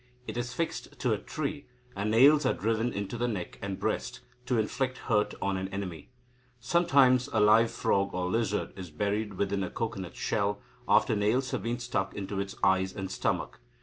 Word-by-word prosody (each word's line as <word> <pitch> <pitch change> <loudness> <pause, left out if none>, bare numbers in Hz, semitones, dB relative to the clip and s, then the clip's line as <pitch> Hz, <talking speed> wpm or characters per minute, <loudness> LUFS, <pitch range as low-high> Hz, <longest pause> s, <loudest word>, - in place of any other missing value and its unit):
It - - -6
is 120 0 -2
fixed 150 -2 -4
to 125 - +2
a 105 - -1
tree, 150 -1 -4 0.3
and 100 +2 -1
nails 140 +7 +6
are 130 - +2
driven 115 +3 0
into 100 +3 -4
the 120 - +1
neck 100 -7 -4
and 100 -1 -4
breast, - - -2 0.3
to 125 - +2
inflict 130 +4 -1
hurt 105 -2 0
on 95 0 0
an 95 0 -3
enemy. 95 -6 -6 0.5
Sometimes 130 -2 +4
a 110 - +1
live 110 +2 +6
frog 100 -2 +1
or 90 0 -1
lizard 105 +1 -1
is 95 -2 -7
buried 105 +5 -2
within 100 +1 0
a 90 - -3
cocoanut 95 -6 -4
shell, 100 0 0 0.3
after 110 - +4
nails 110 +6 +1
have - - -2
been 115 +4 -2
stuck 115 -5 -2
into 100 0 -4
its 100 0 -4
eyes 95 -1 +3
and 95 -1 -4
stomach. - - -2
105 Hz, 185 wpm, -29 LUFS, 95-120 Hz, 0.5 s, nails